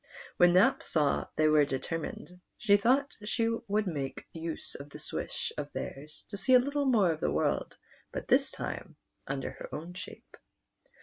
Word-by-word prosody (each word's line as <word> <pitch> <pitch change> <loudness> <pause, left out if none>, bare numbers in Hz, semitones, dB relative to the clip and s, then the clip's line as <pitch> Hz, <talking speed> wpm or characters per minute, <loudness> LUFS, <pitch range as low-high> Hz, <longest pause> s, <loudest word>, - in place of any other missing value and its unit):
When 175 0 +6
Nap 185 +2 +5
saw 150 -3 +1
they 155 - +4
were 155 -1 +6
deter 140 +4 -2
mined, 180 +3 -8 0.2
she 205 -3 +5
thought 260 +7 +3
she 225 +2 +1 0.2
would 210 +1 +1
make 145 -7 -4
use 165 0 -5
of 140 +1 -9
this 150 +1 -8
wish - - -3
of 145 0 -5
theirs 150 +2 -6
to 200 - -5
see 255 +6 +5
a - - +9
little 285 +3 0
more 215 -9 +4
of 155 - -3
the - - +1
world, - - 0 0.3
but - - -5
this - - +4
time - - -6 0.3
under 135 0 -3
her - - -9
own 165 +4 -6
shape. 185 - -10
175 Hz, 180 wpm, -30 LUFS, 150-215 Hz, 0.3 s, a